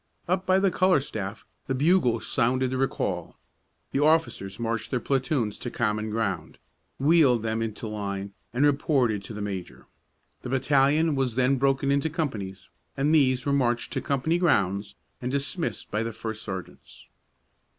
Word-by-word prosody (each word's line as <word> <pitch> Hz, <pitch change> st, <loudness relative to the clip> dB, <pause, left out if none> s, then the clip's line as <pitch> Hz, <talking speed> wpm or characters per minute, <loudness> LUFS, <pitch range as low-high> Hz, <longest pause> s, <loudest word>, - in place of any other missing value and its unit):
Up 185 Hz, +1 st, 0 dB
by 185 Hz, 0 st, +5 dB
the 195 Hz, -1 st, +3 dB
color 185 Hz, -2 st, +4 dB
staff 110 Hz, -6 st, -6 dB, 0.2 s
the 135 Hz, -, 0 dB
bugle 140 Hz, -5 st, +3 dB
sounded 125 Hz, +3 st, +1 dB
the 130 Hz, -, -1 dB
recall. 95 Hz, -9 st, -2 dB, 0.5 s
The 135 Hz, -, 0 dB
officers 150 Hz, -10 st, +1 dB
marched 115 Hz, -1 st, -2 dB
their 125 Hz, -, 0 dB
platoons 130 Hz, -4 st, -1 dB
to 120 Hz, -, -4 dB
common 110 Hz, -2 st, -1 dB
ground, 100 Hz, -7 st, -2 dB, 0.4 s
wheeled 140 Hz, -6 st, +4 dB
them 110 Hz, 0 st, -1 dB
into 115 Hz, 0 st, -4 dB
line, 100 Hz, -2 st, -4 dB, 0.2 s
and 125 Hz, +5 st, +2 dB
reported 135 Hz, -7 st, +2 dB
to 110 Hz, -, -8 dB
the 105 Hz, -, -4 dB
major. 95 Hz, -3 st, -6 dB, 0.6 s
The 125 Hz, -, -6 dB
battalion 140 Hz, +4 st, +3 dB
was 135 Hz, -4 st, 0 dB
then 130 Hz, +2 st, +3 dB
broken 135 Hz, +1 st, +2 dB
into 140 Hz, +3 st, +1 dB
companies, 105 Hz, -, -4 dB, 0.3 s
and 145 Hz, +3 st, +2 dB
these 130 Hz, -4 st, +3 dB
were 140 Hz, -, +1 dB
marched 120 Hz, -4 st, +1 dB
to -, -, -1 dB
company 150 Hz, +5 st, 0 dB
grounds 100 Hz, -, +1 dB, 0.3 s
and 125 Hz, -, -2 dB
dismissed 140 Hz, +5 st, -3 dB
by 105 Hz, -, 0 dB
the 115 Hz, 0 st, -3 dB
first 110 Hz, 0 st, -5 dB
sergeants. 95 Hz, -3 st, -8 dB
125 Hz, 160 wpm, -26 LUFS, 110-140 Hz, 0.6 s, by